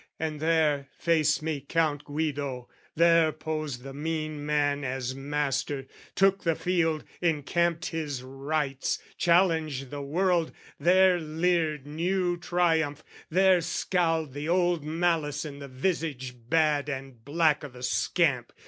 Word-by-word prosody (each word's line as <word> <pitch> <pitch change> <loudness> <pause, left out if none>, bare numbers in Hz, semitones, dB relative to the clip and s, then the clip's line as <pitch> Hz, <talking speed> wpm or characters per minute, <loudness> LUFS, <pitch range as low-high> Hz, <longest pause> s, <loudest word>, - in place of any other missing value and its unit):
And 155 -1 -3
there 155 -3 +2
Faced 155 -3 +2
me 155 -3 -2
Count 155 -3 +1
Guido, 145 -4 -3 0.3
there 165 -1 +5
posed 155 -5 -4
the 135 0 -8
mean 155 0 -3
man 145 -1 +1
As 130 -1 -3
master, 140 -1 -2 0.3
took 195 0 +3
the 165 -2 +2
field, 165 -4 0 0.2
encamped 170 +1 +1
his 150 -6 -4
rights, 135 +1 -2 0.2
Challenged 160 -7 +2
the 145 -1 -5
world: 170 +3 +1 0.3
there 180 +3 +5
leered 160 -2 0
new 175 +4 0
triumph, 165 -4 0 0.3
there 185 +1 +4
Scowled 165 -4 0
the 145 +3 -4
old 175 -3 +2
malice 160 -2 0
in 140 -2 -7
the 140 - -7
visage 135 -2 -2 0.2
bad 150 -3 +2
And 135 -4 -6
black 150 +1 +2
o' - - -4
the 125 0 -12
scamp. 125 0 +1
155 Hz, 130 wpm, -28 LUFS, 140-170 Hz, 0.3 s, there